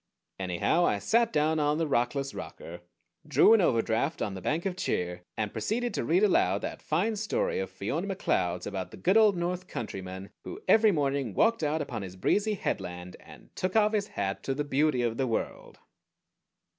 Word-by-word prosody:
Anyhow 95 Hz, -, +1 dB
I -, -, +1 dB
sat 230 Hz, 0 st, +2 dB
down 155 Hz, +1 st, +2 dB
on 150 Hz, 0 st, +1 dB
the 165 Hz, -, +1 dB
rockless 135 Hz, 0 st, 0 dB
rocker, 85 Hz, +1 st, -8 dB, 0.5 s
drew 220 Hz, -, +6 dB
an 225 Hz, -, +5 dB
overdraft 115 Hz, -7 st, +1 dB
on 100 Hz, -, -2 dB
the 95 Hz, -, -7 dB
bank 160 Hz, -, -1 dB
of 190 Hz, -2 st, -1 dB
cheer, 90 Hz, -, -2 dB, 0.2 s
and 105 Hz, -2 st, -2 dB
proceeded 235 Hz, -, -1 dB
to -, -, -1 dB
read 170 Hz, -, +2 dB
aloud 100 Hz, -, +3 dB
that -, -, -5 dB
fine 215 Hz, +5 st, 0 dB
story 470 Hz, -, -1 dB
of 485 Hz, -, -3 dB
Fiona 185 Hz, +4 st, -3 dB
Macleod's 90 Hz, -, -1 dB
about 95 Hz, -2 st, -4 dB
the -, -, -11 dB
good 190 Hz, +3 st, +2 dB
old 215 Hz, -4 st, +5 dB
North 180 Hz, +1 st, -2 dB
Countryman 95 Hz, -, -6 dB
who 365 Hz, -, -7 dB
every 220 Hz, -1 st, +6 dB
morning 140 Hz, -, -1 dB
walked 230 Hz, -3 st, +3 dB
out 150 Hz, 0 st, 0 dB
upon 125 Hz, -, -5 dB
his 95 Hz, -1 st, -7 dB
breezy 205 Hz, -, +1 dB
headland 90 Hz, -, -4 dB
and -, -, -16 dB
"took 185 Hz, +2 st, -2 dB
off 215 Hz, 0 st, +4 dB
his 205 Hz, -1 st, 0 dB
hat 100 Hz, -1 st, -2 dB
to 135 Hz, -, -2 dB
the 150 Hz, -, -1 dB
beauty 145 Hz, -2 st, +1 dB
of 115 Hz, -1 st, -1 dB
the 135 Hz, -, 0 dB
world." 115 Hz, -, -4 dB
150 Hz, 190 wpm, -29 LUFS, -, 0.5 s, drew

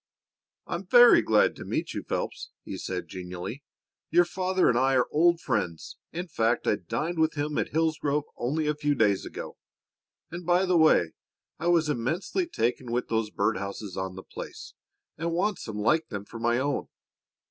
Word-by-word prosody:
"I'm -, -, -5 dB
very 485 Hz, 0 st, +8 dB
glad -, -, +3 dB
to -, -, -7 dB
meet -, -, -3 dB
you, -, -, -3 dB
Phelps," -, -, -4 dB
he 100 Hz, -, -6 dB
said 90 Hz, -1 st, -4 dB
genially. 90 Hz, +7 st, -6 dB, 0.5 s
"Your 175 Hz, +2 st, +5 dB
father 185 Hz, +1 st, +1 dB
and 120 Hz, -, +3 dB
I 130 Hz, +2 st, +3 dB
are 125 Hz, -, +4 dB
old 170 Hz, +2 st, +4 dB
friends. 85 Hz, -, -3 dB
In 175 Hz, +2 st, -4 dB
fact, 115 Hz, -6 st, 0 dB
I 105 Hz, -, +2 dB
dined 160 Hz, -, -3 dB
with 160 Hz, 0 st, +2 dB
him 150 Hz, 0 st, -2 dB
at -, -, -1 dB
Hillsgrove 155 Hz, -2 st, 0 dB
only 150 Hz, +6 st, -1 dB
a 150 Hz, -, +2 dB
few 145 Hz, -1 st, 0 dB
days 105 Hz, -5 st, +2 dB
ago. -, -, -8 dB, 0.7 s
And 175 Hz, +1 st, -6 dB
by 175 Hz, +2 st, +3 dB
the 180 Hz, -1 st, +2 dB
way, 155 Hz, -, +4 dB, 0.5 s
I 170 Hz, -, -2 dB
was 170 Hz, -2 st, +3 dB
immensely 155 Hz, -, -1 dB
taken 120 Hz, -, -1 dB
with 125 Hz, +1 st, -1 dB
those 110 Hz, -1 st, 0 dB
bird 110 Hz, -, 0 dB
houses 100 Hz, 0 st, -6 dB
on 95 Hz, -1 st, -4 dB
the 95 Hz, -, -8 dB
place -, -, -9 dB, 0.5 s
and 165 Hz, 0 st, -1 dB
want 195 Hz, +4 st, 0 dB
some 110 Hz, -2 st, -6 dB
like 155 Hz, +10 st, +2 dB
them 100 Hz, -1 st, -6 dB
for 115 Hz, -, -9 dB
my 120 Hz, +1 st, +2 dB
own. 140 Hz, +2 st, -1 dB
145 Hz, 180 wpm, -27 LUFS, 110-170 Hz, 0.7 s, very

